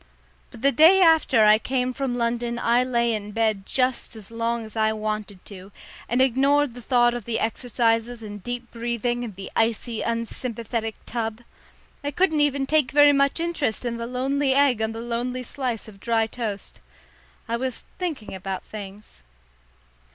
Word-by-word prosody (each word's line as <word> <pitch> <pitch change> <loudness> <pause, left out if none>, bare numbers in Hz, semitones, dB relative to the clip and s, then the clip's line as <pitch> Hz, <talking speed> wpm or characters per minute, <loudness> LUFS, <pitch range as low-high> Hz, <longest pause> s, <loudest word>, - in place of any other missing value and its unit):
But 225 - -13
the 275 - +6
day 325 +9 +7
after 320 -9 +5
I 210 0 +6
came 255 +1 -1
from 265 -2 -2
London 235 0 -1
I 240 +1 +3
lay 235 -2 +1
in 210 -1 -4
bed 215 -3 0
just 255 -2 0
as 215 -1 -12
long 230 0 -2
as 215 - -13
I 220 -1 +2
wanted 215 -3 -4
to, 195 -1 -10 0.4
and 245 +2 +3
ignored 275 +1 +2
the 245 - -9
thought 240 0 +3
of 240 -4 -5
the 230 -1 -1
exercises 230 0 0
and 205 -2 -8
deep 245 0 -5
breathing 240 +1 -2
and 220 -5 -7
the 195 +1 -8
icy 225 0 0
unsympathetic 230 -1 -3
tub. 225 -1 -3 0.6
I 285 - -1
couldn't 315 0 +2
even 280 -2 +1
take 300 -2 +2
very 290 0 +6
much 275 +2 +2
interest 330 -9 -2
in 235 -1 -2
the 230 0 -4
lonely 265 +2 0
egg 275 -5 +3
on 220 0 0
the 225 - -6
lonely 240 +2 -3
slice 250 -3 -3
of 200 -2 -13
dry 225 +1 +1
toast. 220 -3 -5 0.7
I 230 - -1
was 255 0 -4
thinking 315 - -4
about 190 0 -5
things. 200 - -10
235 Hz, 170 wpm, -24 LUFS, 220-260 Hz, 0.7 s, day